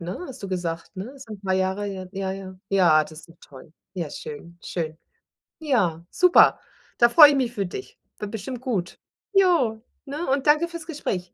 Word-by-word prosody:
ne 180 Hz, -, -6 dB
hast 255 Hz, -4 st, -10 dB
du 195 Hz, -, -5 dB
gesagt, 175 Hz, -2 st, -4 dB
ne? 195 Hz, +5 st, -6 dB
Ist 270 Hz, -2 st, -12 dB
'n 210 Hz, -2 st, -8 dB
paar 190 Hz, -1 st, 0 dB
Jahre, 190 Hz, +2 st, 0 dB
ja, 190 Hz, -2 st, -6 dB, 0.3 s
ja 190 Hz, -1 st, -8 dB
ja, 175 Hz, -6 st, +5 dB
das 155 Hz, -, -10 dB
ist 165 Hz, -, -17 dB
doch 165 Hz, -, -18 dB
toll, 135 Hz, +2 st, -15 dB, 0.2 s
ja, 170 Hz, -5 st, -4 dB
schön, 170 Hz, +5 st, -9 dB
schön. 160 Hz, -2 st, -4 dB, 0.6 s
Ja, 190 Hz, -, 0 dB
super, 360 Hz, -1 st, +5 dB, 0.4 s
da 235 Hz, -, +6 dB
freue 295 Hz, +5 st, +9 dB
ich 290 Hz, -, +2 dB
mich 245 Hz, -2 st, 0 dB
für 200 Hz, -3 st, -2 dB
dich, 400 Hz, -, -8 dB, 0.2 s
wird 210 Hz, -1 st, -5 dB
bestimmt 230 Hz, +3 st, -5 dB
gut. 210 Hz, -10 st, -3 dB, 0.3 s
Ja, 345 Hz, -, +3 dB, 0.2 s
ne? 295 Hz, +4 st, -5 dB
Und 270 Hz, 0 st, +1 dB
danke 305 Hz, +3 st, +4 dB
fürs 335 Hz, -1 st, -8 dB
Gespräch. 185 Hz, -, -4 dB
200 Hz, 190 wpm, -24 LUFS, 175-275 Hz, 0.6 s, freue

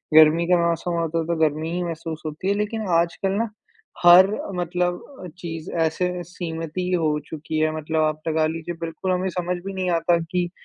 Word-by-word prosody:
गर्मी 160 Hz, +2 st, +7 dB
का 180 Hz, -, +6 dB
मौसम 170 Hz, +1 st, -1 dB
होता 165 Hz, 0 st, -1 dB
है 165 Hz, -, -1 dB
तो, 170 Hz, -, 0 dB
तो -, -, -5 dB
गर्मी 155 Hz, +1 st, +1 dB
ही 180 Hz, 0 st, -1 dB
महसूस 165 Hz, -1 st, -5 dB
होती 155 Hz, +5 st, -5 dB
है। -, -, +4 dB
लेकिन 210 Hz, 0 st, -2 dB
आजकल 175 Hz, +3 st, -1 dB
ना, 225 Hz, +3 st, 0 dB, 0.6 s
हर 175 Hz, +2 st, +9 dB, 0.3 s
मतलब 175 Hz, 0 st, -1 dB, 0.2 s
अ, -, -, -5 dB
चीज़ 165 Hz, -2 st, -6 dB, 0.2 s
ऐसे 180 Hz, +3 st, -1 dB, 0.2 s
सीमित 165 Hz, -3 st, -5 dB
ही 180 Hz, 0 st, -1 dB
हो 155 Hz, -4 st, +2 dB
चुकी 155 Hz, 0 st, -4 dB
है, 155 Hz, 0 st, +1 dB
मतलब 155 Hz, +1 st, -1 dB
आप 155 Hz, 0 st, 0 dB
लगा 155 Hz, 0 st, +2 dB
लीजिए, 165 Hz, +2 st, -4 dB
बिल्कुल 165 Hz, +3 st, -3 dB
हमें 185 Hz, +1 st, 0 dB
समझ 180 Hz, 0 st, -1 dB
भी 195 Hz, -, -4 dB
नहीं 185 Hz, -1 st, -1 dB
आता 170 Hz, +1 st, +3 dB
कि 180 Hz, -1 st, 0 dB
170 Hz, 205 wpm, -23 LUFS, 160-180 Hz, 0.6 s, हर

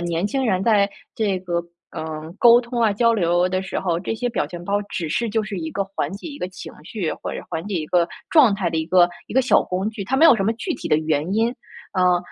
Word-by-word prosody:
年 170 Hz, +1 st, -1 dB
轻 265 Hz, +5 st, -1 dB
人 190 Hz, -3 st, +1 dB
在 205 Hz, -3 st, +4 dB, 0.3 s
这 205 Hz, -4 st, 0 dB
个， 175 Hz, -2 st, -2 dB, 0.3 s
呃 155 Hz, 0 st, -6 dB
沟 240 Hz, -1 st, +7 dB
通 235 Hz, 0 st, -4 dB
啊、 225 Hz, -2 st, +4 dB
交 230 Hz, +2 st, +3 dB
流 175 Hz, -3 st, +2 dB
的 185 Hz, +1 st, -1 dB
时 185 Hz, -, -4 dB
候， 175 Hz, -3 st, -1 dB
这 195 Hz, -, -3 dB
些 245 Hz, +3 st, -3 dB
表 230 Hz, -, -1 dB
情 175 Hz, -1 st, -9 dB
包 200 Hz, +2 st, 0 dB
只 170 Hz, -, -3 dB
是 230 Hz, +9 st, -1 dB
就 220 Hz, +1 st, 0 dB
是 210 Hz, -2 st, -5 dB
一 160 Hz, -2 st, -4 dB
个 200 Hz, +3 st, -2 dB
缓 195 Hz, -6 st, -3 dB
解 200 Hz, -, -8 dB
一 285 Hz, -2 st, -9 dB
个 180 Hz, -, -3 dB
情 185 Hz, -, -10 dB
绪， 175 Hz, 0 st, -3 dB
或 -, -, -6 dB
者 -, -, -6 dB
缓 160 Hz, -, -3 dB
解 205 Hz, -, -4 dB
一 165 Hz, -3 st, -1 dB
个 175 Hz, +1 st, +2 dB, 0.2 s
状 270 Hz, -11 st, +6 dB
态 190 Hz, -4 st, -1 dB
的 160 Hz, -, -1 dB
一 160 Hz, -, -2 dB
个 175 Hz, +1 st, +5 dB, 0.2 s
一 -, -, -9 dB
个 265 Hz, -, +4 dB
小 255 Hz, -, +4 dB
工 190 Hz, +4 st, -2 dB
具， 220 Hz, -2 st, -6 dB
它 255 Hz, +7 st, -1 dB
没 310 Hz, -, +5 dB
有 325 Hz, -, +8 dB
什 205 Hz, -, -1 dB
么 215 Hz, -, +2 dB
具 295 Hz, -, -3 dB
体 -, -, -6 dB
的 -, -, +4 dB
原 155 Hz, +2 st, -1 dB
因。 230 Hz, +3 st, +1 dB, 0.4 s
啊， 180 Hz, -2 st, +3 dB
190 Hz, 285 characters per minute, -22 LUFS, 175-225 Hz, 0.4 s, 有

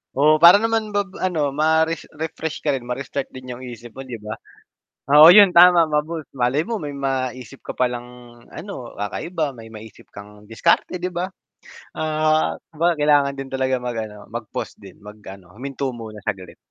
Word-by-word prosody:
Oo, 155 Hz, +3 st, +4 dB
para 170 Hz, +3 st, +9 dB
naman 225 Hz, -2 st, -1 dB
bab 200 Hz, -2 st, -1 dB
ano, 160 Hz, -7 st, 0 dB
ma-res 160 Hz, +2 st, +1 dB
refresh 160 Hz, 0 st, -5 dB
ka 150 Hz, -, +1 dB
rin, 125 Hz, -3 st, -4 dB
ma-restart 135 Hz, +2 st, -4 dB
din 130 Hz, -1 st, -9 dB
yung 120 Hz, -, -8 dB
isip 120 Hz, -1 st, -10 dB
mo 135 Hz, 0 st, -10 dB
'di 120 Hz, -, -6 dB
ba? 105 Hz, +1 st, -6 dB, 0.7 s
Oo 150 Hz, +3 st, +9 dB
yun 200 Hz, +1 st, +9 dB
tama 175 Hz, -1 st, +7 dB
ma-boost, 150 Hz, 0 st, -2 dB
malay 130 Hz, +3 st, 0 dB
mo 230 Hz, -2 st, -3 dB
may 145 Hz, -2 st, -6 dB
maisip 130 Hz, -1 st, -4 dB
ka -, -, -8 dB
palang 120 Hz, -1 st, -1 dB, 0.4 s
ano, 195 Hz, -, -9 dB
kakaiba, 145 Hz, -, -3 dB
may 115 Hz, -2 st, -12 dB
maisip 110 Hz, 0 st, -13 dB
kang 105 Hz, +1 st, -13 dB
diskarte 115 Hz, +9 st, +1 dB
'di 180 Hz, +1 st, -4 dB
ba? 175 Hz, +2 st, -3 dB, 0.7 s
Ah, 155 Hz, -, 0 dB, 0.2 s
kumbaga 165 Hz, +1 st, 0 dB
kailangan 145 Hz, -2 st, +3 dB
din 135 Hz, -1 st, -7 dB
talaga 130 Hz, 0 st, 0 dB
mag 125 Hz, -1 st, -5 dB
ano 105 Hz, -1 st, -9 dB
mag-pause 115 Hz, -2 st, -6 dB
din, -, -, -14 dB
mag-ano, 100 Hz, -3 st, -13 dB
huminto 135 Hz, +3 st, -5 dB
muna 110 Hz, -2 st, -9 dB
saglit. 95 Hz, -2 st, -5 dB
140 Hz, 170 wpm, -21 LUFS, 120-160 Hz, 0.7 s, para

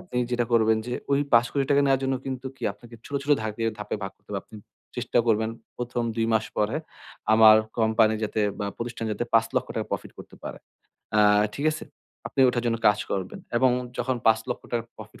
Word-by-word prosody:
আপনি 180 Hz, -8 st, -9 dB
যেটা 120 Hz, -1 st, +1 dB
করবেন 110 Hz, -1 st, +4 dB
যে 125 Hz, -, -4 dB, 0.2 s
ওই 140 Hz, -, +3 dB
৳৫,০০,০০,০০০ 135 Hz, +4 st, +3 dB
নেয়ার 135 Hz, -1 st, +3 dB
জন্য 135 Hz, 0 st, +1 dB
কিন্তু 130 Hz, 0 st, -4 dB
কি -, -, -20 dB
আপনাকে 115 Hz, +3 st, -15 dB
ছোট, 140 Hz, -, -8 dB
ছোট 145 Hz, -, -4 dB
ধাকে 110 Hz, +1 st, -4 dB, 0.2 s
ধাপে 105 Hz, -, -3 dB
ভাগ 95 Hz, -, -3 dB
করতে 100 Hz, -, -42 dB
হবে। 100 Hz, -1 st, -2 dB
আপনি 110 Hz, -, -13 dB, 0.4 s
চেষ্টা -, -, 0 dB
করবেন 110 Hz, 0 st, +2 dB, 0.3 s
প্রথম 120 Hz, 0 st, -3 dB
২ 115 Hz, 0 st, +1 dB
মাস 110 Hz, -, +2 dB
পরে 105 Hz, +7 st, +1 dB, 0.6 s
আমার 110 Hz, 0 st, +8 dB, 0.2 s
company 110 Hz, 0 st, +3 dB
যাতে 110 Hz, 0 st, -2 dB, 0.2 s
বা 100 Hz, -, -2 dB
প্রতিষ্ঠান 115 Hz, -1 st, -4 dB
যাতে, 120 Hz, -, -2 dB
৳৫,০০,০০০ 115 Hz, 0 st, +1 dB
profit -, -, -4 dB
করতে -, -, -12 dB
পারে। -, -, -6 dB, 0.6 s
আ -, -, +6 dB, 0.4 s
ঠিক 145 Hz, +2 st, -1 dB
আছে? 155 Hz, -, -6 dB, 0.4 s
আপনি -, -, -2 dB
ওটার 120 Hz, -1 st, 0 dB
জন্য 115 Hz, -1 st, +1 dB
কাজ 105 Hz, 0 st, +3 dB
করবেন। 95 Hz, -1 st, -3 dB, 0.2 s
এবং 130 Hz, +1 st, +4 dB, 0.3 s
যখন 125 Hz, +1 st, 0 dB
৳৫,০০,০০০ 115 Hz, +1 st, 0 dB
profit -, -, -12 dB
115 Hz, 185 wpm, -26 LUFS, 110-125 Hz, 0.6 s, আমার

